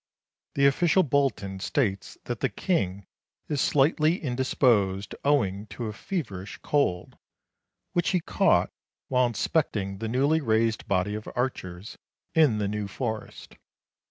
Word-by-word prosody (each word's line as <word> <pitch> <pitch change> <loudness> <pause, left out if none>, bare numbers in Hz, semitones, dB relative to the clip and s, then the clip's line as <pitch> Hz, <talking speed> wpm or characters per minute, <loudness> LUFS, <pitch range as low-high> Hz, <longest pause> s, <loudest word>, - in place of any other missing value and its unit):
The 140 - +3
official 175 +6 +4
bulletin 130 -9 0
states 100 -2 -1
that 120 -2 -4
the - - +1
King 100 - -1 0.4
is 145 -3 -1
slightly 155 +4 +3
indisposed 120 - +1
owing 110 -8 +1
to 120 - -6
a 105 - -4
feverish 105 - -5
cold, 90 -12 0 0.7
which 175 -1 +1
he 185 - +2
caught - - +2 0.4
while 125 -1 +3
inspecting 105 - -1
the 110 - -3
newly 140 +7 +2
raised 110 -3 +1
body 95 +1 +1
of 105 0 -5
archers, 105 -7 -4 0.3
in 150 -9 +4
the 105 -1 0
New 105 0 -3
Forest. 110 +1 -6
115 Hz, 130 wpm, -27 LUFS, 100-140 Hz, 0.7 s, official